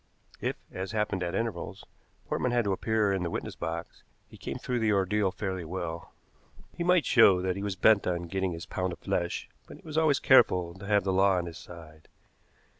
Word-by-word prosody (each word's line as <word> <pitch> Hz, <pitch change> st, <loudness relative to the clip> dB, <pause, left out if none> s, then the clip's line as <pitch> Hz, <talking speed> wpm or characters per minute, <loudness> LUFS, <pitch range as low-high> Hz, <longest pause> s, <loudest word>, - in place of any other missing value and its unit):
If, -, -, -2 dB, 0.2 s
as 95 Hz, +3 st, -5 dB
happened 105 Hz, -3 st, -1 dB
at 85 Hz, -1 st, -2 dB
intervals, 115 Hz, -7 st, -4 dB, 0.4 s
Portman 125 Hz, -, -1 dB
had 120 Hz, -1 st, +2 dB
to 100 Hz, -, +1 dB
appear 105 Hz, 0 st, +1 dB
in 95 Hz, -, -1 dB
the 85 Hz, -, -2 dB
witness -, -, -5 dB
box, 85 Hz, +1 st, -5 dB, 0.3 s
he -, -, -15 dB
came -, -, -6 dB
through 125 Hz, -1 st, -2 dB
the 110 Hz, -2 st, +2 dB
ordeal 100 Hz, 0 st, +2 dB
fairly 95 Hz, -2 st, -4 dB
well. 85 Hz, 0 st, -5 dB, 0.6 s
He 170 Hz, -, -2 dB
might 180 Hz, -2 st, +3 dB
show 100 Hz, -7 st, +6 dB
that 95 Hz, -1 st, 0 dB
he 100 Hz, -, -5 dB
was 100 Hz, -2 st, -2 dB
bent 105 Hz, +2 st, +4 dB
on 85 Hz, -1 st, -1 dB
getting 95 Hz, +2 st, -2 dB
his 85 Hz, 0 st, -7 dB
pound 90 Hz, -1 st, -3 dB
of -, -, -9 dB
flesh, 85 Hz, 0 st, -2 dB, 0.2 s
but -, -, -11 dB
he -, -, -20 dB
was 155 Hz, 0 st, -1 dB
always 150 Hz, -4 st, +3 dB
careful 90 Hz, -9 st, +4 dB
to 100 Hz, +2 st, -10 dB
have 100 Hz, -2 st, +3 dB
the 95 Hz, 0 st, 0 dB
law 95 Hz, 0 st, +4 dB
on 90 Hz, -, -1 dB
his 85 Hz, -1 st, -8 dB
side. 80 Hz, -3 st, -13 dB
95 Hz, 210 wpm, -29 LUFS, 85-105 Hz, 0.6 s, show